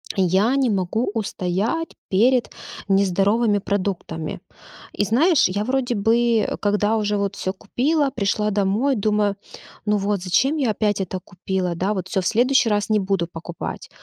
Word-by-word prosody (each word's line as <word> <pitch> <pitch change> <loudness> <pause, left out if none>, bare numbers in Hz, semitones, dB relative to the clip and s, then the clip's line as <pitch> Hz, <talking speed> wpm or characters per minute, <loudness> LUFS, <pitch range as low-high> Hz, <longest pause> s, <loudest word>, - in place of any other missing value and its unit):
я 195 +7 +2
не 265 -3 +2
могу 200 +3 -1
устоять 215 - -2 0.2
перед 240 +5 +3 0.4
нездоровыми 200 +3 +2
продуктами. 190 -5 -3 0.5
И - - 0
знаешь, 265 - +3
я 200 +3 -2
вроде 255 -1 0
бы, 225 +1 +2
когда 210 +1 +1
уже 210 -1 0
вот 200 -1 -2
всё 185 - -3
купила, 275 +9 0
пришла 210 +1 0
домой, 210 +7 +1
думаю: 210 -1 +1 0.5
"Ну 210 0 +2
вот, 200 -2 -1
зачем 265 - +2
я 260 -6 +1
опять 205 -1 0
это 185 0 -4
купила, 180 -1 -3
да? 190 +5 0
Вот 185 -2 -4
всё, 190 - -1
в 180 - -7
следующий 250 +1 +3
раз 205 0 0
не 215 -1 +3
буду 190 -3 -1
покупать". 170 0 -7
205 Hz, 155 wpm, -22 LUFS, 190-230 Hz, 0.5 s, перед